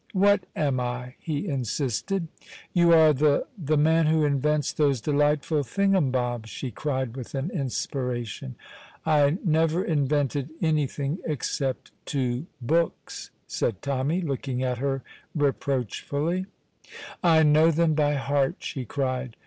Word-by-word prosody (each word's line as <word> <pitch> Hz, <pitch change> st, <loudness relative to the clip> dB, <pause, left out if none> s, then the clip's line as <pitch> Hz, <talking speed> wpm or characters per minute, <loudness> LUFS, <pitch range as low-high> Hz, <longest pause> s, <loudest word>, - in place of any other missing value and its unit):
"What 200 Hz, 0 st, +3 dB
am 140 Hz, -4 st, +1 dB
I?" 125 Hz, 0 st, -4 dB
he 155 Hz, +4 st, -3 dB
insisted. 140 Hz, -, -2 dB, 0.5 s
"You 170 Hz, -1 st, +5 dB
are 160 Hz, -2 st, +7 dB
the 145 Hz, +1 st, +2 dB
the 155 Hz, -6 st, 0 dB
man 160 Hz, +2 st, +4 dB
who 155 Hz, -1 st, +3 dB
invents 145 Hz, +1 st, +1 dB
those 140 Hz, -4 st, +2 dB
delightful 150 Hz, +3 st, +1 dB
thingumbobs," 130 Hz, -, 0 dB
she 125 Hz, +2 st, -5 dB
cried 130 Hz, -1 st, -2 dB
with 130 Hz, 0 st, -7 dB
an 135 Hz, +6 st, -2 dB
inspiration. 125 Hz, -, -3 dB, 0.5 s
"I 150 Hz, 0 st, +3 dB
never 165 Hz, +2 st, +2 dB
invented 145 Hz, -2 st, 0 dB
anything, 150 Hz, -1 st, 0 dB
except 135 Hz, -3 st, -3 dB, 0.2 s
two 130 Hz, +1 st, -1 dB
books," 160 Hz, +7 st, -1 dB, 0.2 s
said 100 Hz, -5 st, -2 dB
Tommy, 140 Hz, +5 st, 0 dB
looking 135 Hz, -4 st, -2 dB
at 125 Hz, -2 st, -1 dB
her 135 Hz, 0 st, -1 dB, 0.3 s
reproachfully. 145 Hz, -, -1 dB, 0.8 s
"I 160 Hz, -2 st, +5 dB
know 155 Hz, +2 st, +5 dB
them 165 Hz, 0 st, +2 dB
by 145 Hz, -1 st, +2 dB
heart," 140 Hz, 0 st, +1 dB
she 130 Hz, -3 st, -5 dB
cried. 130 Hz, -1 st, -2 dB
145 Hz, 125 wpm, -26 LUFS, 130-160 Hz, 0.8 s, are